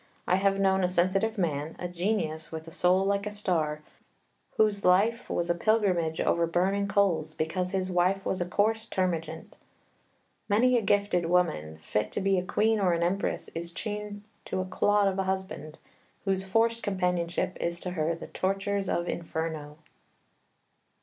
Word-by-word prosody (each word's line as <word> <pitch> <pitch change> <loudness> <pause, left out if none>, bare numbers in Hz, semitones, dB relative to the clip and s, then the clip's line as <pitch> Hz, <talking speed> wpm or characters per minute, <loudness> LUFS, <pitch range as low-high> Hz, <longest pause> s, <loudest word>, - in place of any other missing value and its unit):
I 180 - +3
have 195 0 +2
known 190 -1 +3
a - - +4
sensitive 195 +5 +1
man, 155 -4 -1
a 180 - -4
genius 175 -3 -2
with 160 0 -7
a - - -9
soul 180 +3 +3
like 200 +1 0
a - - -3
star, 160 -7 -1 0.7
whose 210 -2 +2
life 210 +6 +3
was 175 - -1
a 175 - +2
pilgrimage 180 -4 +1
over 170 0 +2
burning 195 +4 +1
coals, 170 -6 +1
because 180 +3 -1
his 185 -1 -2
wife 185 +2 +1
was 185 - -1
a 175 - -1
coarse 220 +4 +1
termagant. 165 -4 -2 0.9
Many 245 +5 +4
a 240 - +3
gifted 200 -4 +1
woman, 160 - +1
fit 105 +5 -1
to - - -1
be 195 -1 +2
a - - -3
queen 220 +4 +1
or 185 -3 +3
an 170 0 0
empress, 190 +3 -1
is 170 +1 -5
chained 210 +1 -5 0.2
to 190 - -3
a 185 - -1
clod 205 +2 +2
of 195 0 -1
a - - +2
husband, 190 -5 -4 0.5
whose 190 -1 0
forced 230 +3 +2
companionship 180 -3 -1
is 170 0 -1
to 180 - -4
her 165 -1 0
the 165 - -8
tortures 195 +1 -1
of 170 0 -1
Inferno." 160 -3 -4
185 Hz, 170 wpm, -28 LUFS, 170-200 Hz, 0.9 s, a